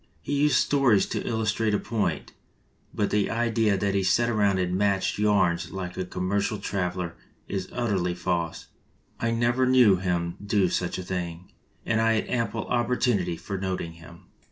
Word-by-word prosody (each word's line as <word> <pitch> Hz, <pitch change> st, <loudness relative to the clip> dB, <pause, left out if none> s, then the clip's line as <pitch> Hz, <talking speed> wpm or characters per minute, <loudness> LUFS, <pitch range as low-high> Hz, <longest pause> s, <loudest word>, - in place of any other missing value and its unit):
He -, -, -3 dB
used 145 Hz, +1 st, +3 dB
stories 135 Hz, -8 st, +3 dB
to -, -, -2 dB
illustrate 110 Hz, -1 st, 0 dB
a -, -, 0 dB
point, 110 Hz, -2 st, -2 dB, 0.6 s
but 105 Hz, -, -1 dB
the 105 Hz, -1 st, +1 dB
idea 115 Hz, -3 st, +1 dB
that 100 Hz, 0 st, 0 dB
he 100 Hz, -, +2 dB
sat 95 Hz, +6 st, +2 dB
around 100 Hz, -3 st, +2 dB
and 90 Hz, -1 st, 0 dB
matched 100 Hz, 0 st, +1 dB
yarns 100 Hz, -5 st, +2 dB
like 90 Hz, -1 st, -5 dB
a 95 Hz, -, -2 dB
commer 90 Hz, +2 st, -1 dB
cial 105 Hz, +1 st, -2 dB
traveler 90 Hz, -3 st, -2 dB, 0.3 s
is 95 Hz, -1 st, -4 dB
utterly 95 Hz, -7 st, -1 dB
false. 85 Hz, -2 st, -2 dB, 0.5 s
I 115 Hz, -, 0 dB
never 120 Hz, +2 st, +2 dB
knew 125 Hz, -7 st, +6 dB
him 85 Hz, -2 st, -2 dB
to -, -, -12 dB
do 100 Hz, -2 st, +2 dB
such 90 Hz, 0 st, -1 dB
a 95 Hz, -, -5 dB
thing, 90 Hz, -1 st, -5 dB, 0.3 s
and 110 Hz, 0 st, +1 dB
I 115 Hz, 0 st, +3 dB
had 110 Hz, -, -1 dB
ample 115 Hz, -2 st, -1 dB
opportunity 120 Hz, -7 st, 0 dB
for 100 Hz, +2 st, -5 dB
noting 95 Hz, -3 st, -3 dB
him." 85 Hz, +1 st, -14 dB
100 Hz, 175 wpm, -26 LUFS, 90-115 Hz, 0.6 s, knew